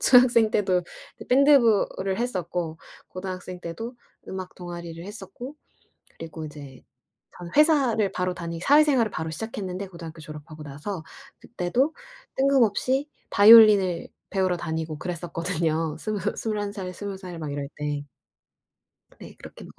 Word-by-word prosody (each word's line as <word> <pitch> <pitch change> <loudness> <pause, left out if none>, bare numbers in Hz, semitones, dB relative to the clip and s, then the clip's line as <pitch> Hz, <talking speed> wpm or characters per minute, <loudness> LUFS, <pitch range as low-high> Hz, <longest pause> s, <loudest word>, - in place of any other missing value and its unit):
중학생 245 -3 +6
때도 185 -4 +2 0.5
밴드부를 235 -8 +4
했었고 180 -8 -3 0.3
고등학생 185 -1 -6
때도 225 +9 -6 0.3
음악 185 -1 -6
동아리를 170 -1 -8
했었고 210 +7 -8 0.6
그리고 160 -1 -7
이제 145 -3 -11 0.5
전 175 -1 -8
회사를 270 -9 +4
바로 180 0 -1
다니 170 -2 -6
사회생활을 280 -3 +4
바로 160 -2 -4
시작했는데, 195 -1 -5
고등학교 170 -2 -10
졸업하고 155 0 -10
나서. 150 +6 -6 0.4
그때도 240 - -1 0.4
뜬금없이 270 +1 +2 0.2
바이올린을 205 -4 +7 0.2
배우러 185 -2 +1
다니고 160 -2 -4
그랬었거든요. 165 -2 -2
스무 215 -1 -3 0.2
21 205 -2 -2
살, 185 -3 -6
20 200 +1 -6
살 180 -3 -8
막 150 -3 -4
이럴 140 -1 -4
때. 145 -1 -3 1.1
네, - - -11
그렇게 - - -12
185 Hz, 295 characters per minute, -25 LUFS, 165-220 Hz, 1.1 s, 바이올린을